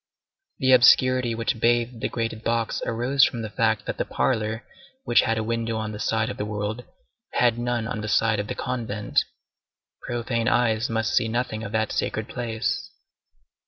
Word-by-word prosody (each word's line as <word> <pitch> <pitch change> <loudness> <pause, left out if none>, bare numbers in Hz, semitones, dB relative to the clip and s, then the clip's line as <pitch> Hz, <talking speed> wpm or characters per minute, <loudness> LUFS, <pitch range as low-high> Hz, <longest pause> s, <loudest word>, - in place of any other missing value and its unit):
The 130 0 +2
obscurity 125 -1 +5
which 115 0 -2
bathed 120 0 +1
the - - -1
grated 115 -2 -3
box 115 -1 -1
arose 125 +4 +2
from 115 -2 +1
the 110 - -6
fact 110 0 +1
that - - -4
the - - +2
parlor, 110 -2 -1 0.4
which 120 - +4
had 115 0 0
a 110 - -1
window 115 0 -2
on 110 -1 -3
the 105 - -7
side 110 +2 0
of - - -8
the 105 - -2
world, 105 +3 -3 0.5
had 120 -1 +2
none 120 -2 -1
on 115 -3 -4
the 110 - -4
side 110 0 +2
of 105 - -3
the - - -4
convent. 115 -5 -1 0.8
Profane 120 -1 -2
eyes 120 -2 +2
must 110 -2 -1
see 115 - +3
nothing 110 -1 -2
of 105 - -6
that 110 -1 0
sacred 110 0 -2
place. 115 -3 -3
115 Hz, 180 wpm, -24 LUFS, 110-120 Hz, 0.8 s, obscurity